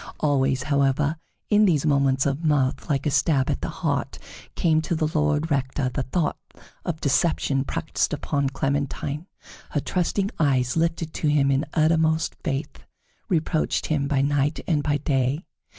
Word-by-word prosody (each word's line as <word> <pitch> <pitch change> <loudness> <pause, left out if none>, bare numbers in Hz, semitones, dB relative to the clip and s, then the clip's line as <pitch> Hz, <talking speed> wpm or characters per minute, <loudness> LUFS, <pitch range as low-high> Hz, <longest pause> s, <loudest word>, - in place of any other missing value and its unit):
Always, 135 -3 +1
however, 140 +1 +1 0.3
in 210 0 +5
these 160 -6 +2
moments 140 -2 +2
of 140 +3 -1
mirth, 145 -4 +1
like 140 -2 0
a 150 - +1
stab 135 -1 +2
at - - -3
the - - -3
heart - - -2 0.4
came 160 -2 +2
to 165 - -2
the 155 -1 +1
Lord 150 +1 +1
Rector 135 -1 0
the 135 - -1
thought 150 +5 -1 0.4
of 170 -3 -3
deception 140 -2 +1
practiced 165 +2 -1
upon 140 -1 -1
Clementine. 140 +3 -2 0.4
Her 145 - -1
trusting 190 +6 -1
eyes, 130 -5 +2
lifted 165 -1 -1
to 155 - -1
him 145 -2 +3
in 135 +3 +1
uttermost 160 0 +2
faith, 140 +2 -3 0.5
reproached 160 -3 0
him 145 -3 0
by 140 -2 +1
night 145 +1 +1
and 155 -4 +1
by 145 0 +1
day. 140 +3 0
145 Hz, 155 wpm, -24 LUFS, 135-160 Hz, 0.5 s, in